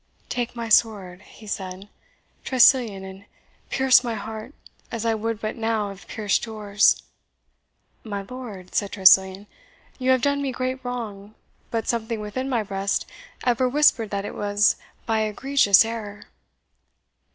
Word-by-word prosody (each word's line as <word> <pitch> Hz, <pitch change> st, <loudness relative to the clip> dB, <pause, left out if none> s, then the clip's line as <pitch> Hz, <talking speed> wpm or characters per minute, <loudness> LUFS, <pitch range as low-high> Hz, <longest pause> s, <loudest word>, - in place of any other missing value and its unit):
"Take 245 Hz, -1 st, -3 dB
my 235 Hz, -1 st, -4 dB
sword," 205 Hz, -5 st, +2 dB
he 215 Hz, -, -16 dB
said, 190 Hz, -1 st, -6 dB, 0.6 s
"Tressilian, 240 Hz, -6 st, +4 dB
and 190 Hz, +1 st, -11 dB, 0.4 s
pierce 265 Hz, -1 st, +4 dB
my 235 Hz, -2 st, -2 dB
heart, 220 Hz, +5 st, -7 dB, 0.4 s
as 230 Hz, -1 st, -4 dB
I 225 Hz, -, +2 dB
would 225 Hz, 0 st, -3 dB
but 215 Hz, -, -4 dB
now 225 Hz, -2 st, -1 dB
have 195 Hz, 0 st, -12 dB
pierced 210 Hz, -2 st, -1 dB
yours!" 210 Hz, -2 st, +2 dB, 1.0 s
"My 205 Hz, -3 st, -5 dB
lord," 210 Hz, -6 st, -9 dB
said 200 Hz, -2 st, -1 dB
Tressilian, 190 Hz, 0 st, +5 dB, 0.5 s
"you 255 Hz, 0 st, 0 dB
have 260 Hz, -2 st, +3 dB
done 280 Hz, 0 st, +1 dB
me 275 Hz, -1 st, -1 dB
great 255 Hz, +1 st, -3 dB
wrong, 220 Hz, -4 st, -6 dB, 0.3 s
but 230 Hz, -1 st, -3 dB
something 230 Hz, -1 st, -2 dB
within 235 Hz, +6 st, -4 dB
my 235 Hz, -4 st, 0 dB
breast 195 Hz, -1 st, -2 dB, 0.4 s
ever 250 Hz, +1 st, +2 dB
whispered 255 Hz, -5 st, +3 dB
that 200 Hz, 0 st, -3 dB
it -, -, -6 dB
was 205 Hz, 0 st, +2 dB, 0.3 s
by 225 Hz, -1 st, +1 dB
egregious 215 Hz, -1 st, +4 dB
error." 215 Hz, -3 st, -6 dB
220 Hz, 140 wpm, -24 LUFS, 200-245 Hz, 1.0 s, Tressilian